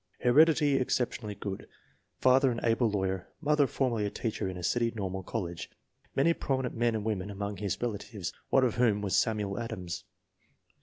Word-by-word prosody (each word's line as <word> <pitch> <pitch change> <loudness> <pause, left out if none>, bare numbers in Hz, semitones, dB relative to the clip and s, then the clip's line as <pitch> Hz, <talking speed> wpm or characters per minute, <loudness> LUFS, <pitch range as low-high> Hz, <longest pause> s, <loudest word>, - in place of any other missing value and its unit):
Heredity 145 +2 +5
exceptionally 120 -4 -1
good. 100 -1 -6 0.5
Father 130 +1 +5
an 120 - -3
able 115 0 +3
law 100 -2 -1
yer; 95 -1 -2
mother 150 -2 +3
formerly 120 -6 0
a 100 - 0
teacher 110 -3 -3
in 90 - -6
a 90 - -7
city 115 +5 +1
normal 95 -2 -3
college. 90 -4 -4 0.5
Many 160 +5 +4
prominent 130 -5 -1
men 120 0 +1
and 110 -1 -3
women 105 -3 -2
among 100 0 -4
his 100 -1 -2
relatives, 100 -6 -4 0.2
one 135 - +4
of 120 -3 +1
whom 110 -4 +3
was 100 - 0
Samuel 105 -3 +1
Adams. 90 -7 -5
110 Hz, 170 wpm, -30 LUFS, 100-125 Hz, 0.5 s, Heredity